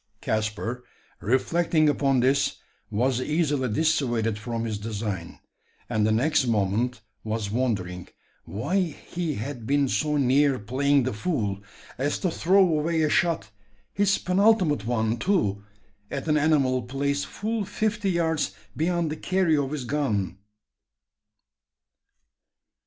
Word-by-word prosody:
Caspar, 110 +4 -2 0.4
reflecting 155 - +2
upon 135 -3 +2
this, 135 +3 +2 0.3
was 120 +4 +1
easily 145 -3 0
dissuaded 120 -6 +1
from 115 +1 -3
his 110 -2 -3
design; 105 -5 -4 0.5
and 110 0 +1
the - - +2
next 130 +4 +2
moment 110 +3 0 0.2
was 110 -2 -3
wondering 100 -7 -2 0.4
why 140 - -1
he 170 -2 -3
had 120 0 -6
been 140 0 +2
so 150 +3 0
near 140 +1 +3
playing 135 +6 +1
the 130 - -1
fool 105 - -2 0.4
as 145 +2 0
to 180 - -1
throw 190 +5 +4
away 160 0 +1
a 155 - +2
shot 165 -11 +1 0.4
his 200 -1 +2
penultimate 180 - +2
one, 115 -1 0
too 105 - +1 0.5
at 140 +2 -4
an 150 - +3
animal 145 -4 +2
placed 140 +3 -2
full 220 +1 -3
fifty 210 0 -1
yards 160 - 0 0.2
beyond 170 0 0
the - - -2
carry 185 -1 +1
of 140 -2 0
his 145 -3 -4
gun! 110 -9 -1
135 Hz, 125 wpm, -26 LUFS, 110-160 Hz, 0.5 s, throw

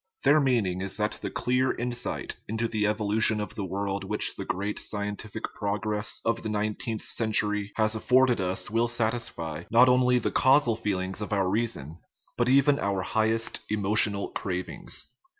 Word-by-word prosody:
Their 155 - +6
mean 125 -7 +2
ing 90 0 -2
is 95 +1 -3
that 105 0 -1
the - - -3
clear 130 +1 +1
insight 120 0 -3
into 110 +2 -1
the 105 -2 0
evolution 105 +1 +1
of 105 - -4
the 100 - -4
world 100 +1 -3
which 105 +2 0
the - - -6
great 100 +2 -2
scientific 105 +1 -5
progress 105 +1 -2
of 115 0 +1
the 110 - -4
nine 105 0 0
teenth 110 +1 -5
century 105 -2 0
has 110 -1 +2
afforded 125 0 +3
us 95 +2 -1
will 115 +2 +2
satisfy, 110 -9 -2
not 120 +3 +6
only, 125 0 +4
the 120 - -1
causal 130 -3 +4
feeling 95 -4 -2
of 105 - -5
our 100 -2 +1
reason, 95 - -2 0.4
but 120 +1 +1
even 140 +2 +4
our 100 -2 -1
highest 110 +3 0
emotional 105 -1 +2
cravings. 90 -1 -4
105 Hz, 170 wpm, -27 LUFS, 100-120 Hz, 0.4 s, Their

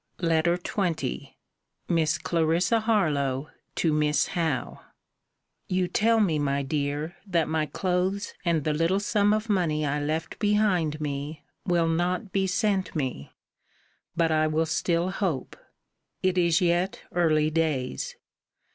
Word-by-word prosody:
LETTER 165 +1 +2
XX 175 - -3 0.5
MISS 160 -2 +2
CLARISSA 170 +5 +1
HARLOWE, 150 - 0 0.2
TO 160 -3 +1
MISS 150 0 +2
HOWE 165 -7 -2 0.9
You 185 -1 +1
tell 225 +5 +2
me, 170 -8 +2
my 140 -1 0
dear, 145 +3 -2
that 170 -4 +1
my 155 -1 0
clothes 185 +5 -1
and 170 -4 +1
the 155 - 0
little 165 +5 +1
sum 205 0 +2
of 215 +1 0
money 165 -7 +1
I 145 +1 -1
left 155 +2 -3
behind 205 -8 +2
me, 145 +1 -4 0.2
will 170 -2 +2
not 180 +5 -1
be 195 -1 +1
sent 195 -1 0
me. 130 - -3 0.8
But 165 -1 +2
I 155 0 +3
will 155 +1 +1
still 170 +2 0
hope. 185 -9 -2 0.7
It 185 -1 +2
is 170 0 +3
yet 175 +2 +1
early 155 -3 +2
days. 150 - -1
165 Hz, 130 wpm, -26 LUFS, 155-185 Hz, 0.9 s, I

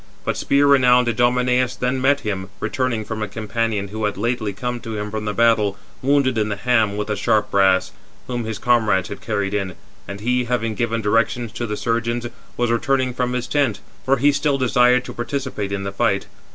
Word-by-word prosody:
But - - 0
spear 140 +1 +2
renowned 125 -3 +5
Idomeneus 125 +1 +2
then 125 +1 -1
met 140 +2 +3
him, 95 -3 -4
returning 125 -4 -1
from 110 0 -5
a 105 - -1
companion 110 -1 -2
who 110 +1 -3
had 105 -2 -2
lately 115 0 -1
come 125 +5 -4
to 115 -3 -6
him 105 0 -4
from 110 0 -4
the 105 - -1
battle, 110 -3 +3 0.2
wounded 130 -3 +2
in 105 0 0
the 105 - -1
ham 110 -1 +1
with 105 - -2
the 105 - -1
sharp 105 +1 +1
brass, 95 -1 +3 0.3
whom 120 -2 -3
his 110 -1 -4
comrades 105 -5 +2
had 100 - -7
carried 100 -3 -2
in, 95 -4 -2 0.3
and 100 0 -7
he, 125 +2 +1
having 115 -2 -1
given 115 +1 -1
directions 115 +2 +1
to 115 +2 -4
the 105 0 -3
surgeons, 115 +1 -1 0.3
was 120 -1 +1
returning 130 +2 +1
from 125 0 -1
his 125 -1 -2
tent; 130 -7 0 0.2
for 135 +1 +2
he 145 +1 +4
still 145 0 +1
desired 125 -1 +3
to - - -7
participate 120 -4 -3
in 100 0 -2
the 100 - -3
fight. 100 -1 0
115 Hz, 205 wpm, -21 LUFS, 105-125 Hz, 0.3 s, renowned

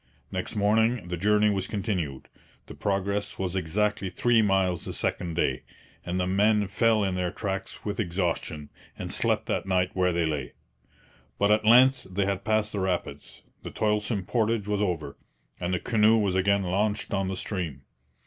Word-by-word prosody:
Next - - -4
morning 110 0 +2
the 90 - -2
journey 105 +3 +3
was 95 -2 -1
continued; 90 - -3 0.4
the - - -10
progress 100 +1 -2
was 95 -1 -2
exactly 100 +3 0
three 115 +5 +3
miles 95 -4 +1
the - - -5
second 85 -2 -2
day, - - 0 0.4
and 90 +1 -2
the 90 - +1
men 105 +3 +3
fell 110 +2 +2
in 95 -2 0
their 90 -1 -1
tracks 95 +1 -5
with 105 +1 -3
exhaustion, 85 -6 -2 0.3
and - - -5
slept - - +1
that - - -2
night 90 -1 +1
where 90 -1 +2
they 85 -1 0
lay. 75 -5 -3 0.8
But 100 +1 +3
at 105 0 +3
length 130 +3 +6
they 95 +1 0
had 100 0 -2
passed 110 0 +1
the 100 - -3
rapids; 90 -6 -3 0.2
the - - -7
toilsome 105 -2 -1
portage 110 -1 0
was 105 -1 0
over, 85 -8 -2 0.4
and 90 0 -2
the 90 - 0
canoe 110 +1 +3
was 100 -4 +1
again 100 +1 +2
launched 105 +4 -1
on 95 -1 0
the 95 0 -3
stream. 85 -10 -4
100 Hz, 175 wpm, -27 LUFS, 90-105 Hz, 0.8 s, length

